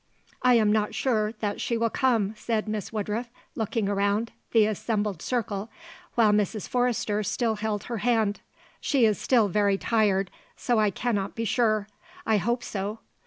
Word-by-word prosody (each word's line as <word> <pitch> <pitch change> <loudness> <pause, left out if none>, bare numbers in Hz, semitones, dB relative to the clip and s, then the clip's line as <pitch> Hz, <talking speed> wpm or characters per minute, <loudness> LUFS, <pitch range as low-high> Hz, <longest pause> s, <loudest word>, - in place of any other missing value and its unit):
"I 250 -1 +5
am 215 -2 +4
not 210 -1 +1
sure 215 -4 +1
that 205 -1 -2
she 235 - 0
will 230 -1 +1
come," 225 -6 +1
said 220 0 -2
Miss 215 -2 -3
Woodruff, 220 +2 -3 0.2
looking 220 -2 -1
around 205 +3 0 0.2
the 225 -2 +5
assembled 210 -3 -1
circle, 220 -4 -2 0.5
while 225 -3 +5
Mrs. 210 0 0
Forrester 240 -4 0
still 220 +2 -1
held 210 -1 -2
her 235 - -4
hand. 220 -3 +1 0.4
"She 270 -6 +2
is 210 -3 +2
still 235 -5 +3
very 200 0 +2
tired, 200 -4 +1 0.3
so 240 -3 +1
I 210 -1 +4
cannot 205 -1 -2
be 230 - -2
sure; 215 -2 +1 0.4
I 220 - +3
hope 240 +5 -1
so." 205 +2 -4
215 Hz, 165 wpm, -26 LUFS, 205-230 Hz, 0.5 s, I